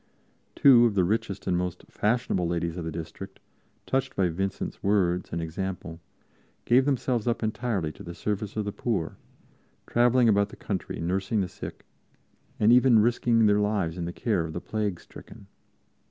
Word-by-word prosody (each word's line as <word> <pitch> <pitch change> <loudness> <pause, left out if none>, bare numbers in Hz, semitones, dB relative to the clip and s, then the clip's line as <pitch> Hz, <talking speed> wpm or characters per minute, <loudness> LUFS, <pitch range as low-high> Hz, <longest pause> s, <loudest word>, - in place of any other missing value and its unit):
Two 120 -4 +7
of 105 - -3
the 95 - +3
richest 105 +1 -2
and 90 - +1
most 90 0 -3
fashionable 105 -5 0
ladies 85 -1 -2
of 90 - -5
the 80 - -4
district, 85 +4 -8 0.5
touched 135 0 -1
by 95 -2 +2
Vincent's 95 +3 -4
words 95 -3 +1
and - - -2
example, 85 0 -5 0.7
gave 130 +2 +4
themselves 125 -4 0
up 120 -1 0
entirely 110 -7 -1
to - - -15
the 85 0 -8
service 105 +1 -3
of 105 - -1
the 100 - -2
poor, 100 -7 -2 0.7
traveling 120 +1 +3
about 100 -2 +3
the - - -11
country - - -4
nursing 95 +5 -1
the 95 - -1
sick, - - -9 0.7
and 110 +3 +5
even 125 -1 +6
risking 115 0 +3
their 105 0 +4
lives 105 -6 0
in 85 -2 -4
the 85 - -4
care 100 -2 -1
of 80 -1 -6
the 85 - -3
plague 105 -3 -3
stricken. - - -14
100 Hz, 170 wpm, -27 LUFS, 90-115 Hz, 0.7 s, Two